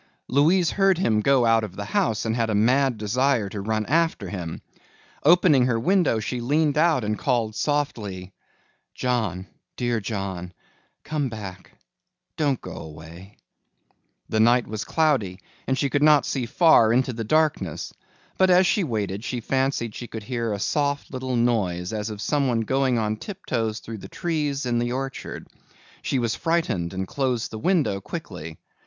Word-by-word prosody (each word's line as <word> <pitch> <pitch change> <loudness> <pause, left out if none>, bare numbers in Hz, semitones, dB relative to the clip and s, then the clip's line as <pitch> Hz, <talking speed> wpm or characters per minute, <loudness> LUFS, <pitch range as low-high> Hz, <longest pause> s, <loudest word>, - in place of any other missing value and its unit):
Louise 160 +6 +3
heard 195 -2 +3
him 110 - +2
go 135 +1 +3
out 115 -1 +4
of 105 - -6
the 100 - -5
house 110 +1 0
and 110 0 0
had 115 -2 0
a 110 - +1
mad 125 +4 +3
desire 120 +1 +1
to 100 +1 -5
run 110 +1 -1
after 160 - +1
him. 85 -4 -5 0.6
Opening 155 -5 +5
her 115 -2 +1
window 175 - +2
she 120 +3 -3
leaned 145 +4 +1
out 155 -5 +3
and 105 0 -2
called 120 -5 0
softly, 105 -10 -2 0.6
"John, 110 -8 -1 0.3
dear 120 -2 0
John, 95 -4 -4 0.5
come 150 -3 -2
back, 100 -4 -9 0.6
don't 145 -5 0
go - - -8
away." 80 +5 -11 0.9
The 110 - -1
night 120 +2 +4
was 110 -1 -5
cloudy 135 - +1 0.3
and 130 - +1
she 140 - +1
could 145 - +1
not 150 -1 +5
see 125 -4 -2
far 160 -7 +5
into 130 +1 +2
the 115 0 -4
darkness, 150 - 0 0.5
but 190 0 +5
as 180 +1 +6
she 195 +2 +2
waited 105 - -3
she 125 - -3
fancied 130 -2 -1
she 120 - -7
could 110 -2 -7
hear 115 0 -2
a 100 - -1
soft 145 +6 -1
little 130 -1 -3
noise 105 -6 0
as 105 0 -3
of 105 -1 -7
someone 130 -5 +1
going 130 +2 +1
on 110 -1 -1
tiptoes 115 - -3
through 110 -1 -8
the - - -9
trees 150 -5 -2
in 120 -1 +1
the 120 +1 -1
orchard. 135 0 -5 0.5
She 135 - -1
was 115 -3 0
frightened 165 - -1
and 95 0 -4
closed 130 -3 -1
the 110 - -6
window 145 - +1
quickly. 90 - -7
120 Hz, 165 wpm, -24 LUFS, 105-140 Hz, 0.9 s, as